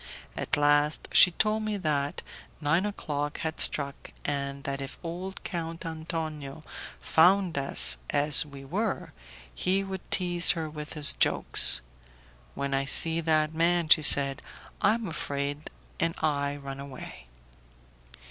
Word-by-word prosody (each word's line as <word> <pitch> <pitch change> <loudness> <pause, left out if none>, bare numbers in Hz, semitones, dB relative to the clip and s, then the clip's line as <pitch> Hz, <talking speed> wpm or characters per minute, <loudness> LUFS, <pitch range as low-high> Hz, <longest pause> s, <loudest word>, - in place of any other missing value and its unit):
At - - +1
last 145 +1 +1
she - - +7
told 215 +5 -2
me 215 -1 -4
that 145 -5 -3 0.4
nine 165 +6 0
o'clock 145 -7 -5
had 160 0 -5
struck, 140 -1 -2 0.2
and 140 -1 -4
that 140 0 -5
if 135 0 -9
old 180 +3 -8
Count 165 -2 -7
Antonio 160 -3 -7 0.4
found 180 +2 +2
us 135 - +3
as 145 +1 +5
we 140 -2 -13
were, 200 +8 -4 0.4
he 190 +2 -1
would 190 -1 -7
tease 175 -2 +2
her 160 -1 -4
with 150 -1 -9
his 150 -2 +2
jokes. - - +6 0.7
"When 140 0 -4
I 135 0 -1
see 160 +4 +5
that 155 -1 0
man," 170 0 0
she 155 - +5
said, 140 -1 +3 0.4
"I 215 - +2
am 230 -3 -6
afraid 145 -2 -5 0.3
and 165 0 -2
I 145 -2 -2
run 140 -1 -9
away." 130 - -11
155 Hz, 140 wpm, -26 LUFS, 140-170 Hz, 0.7 s, she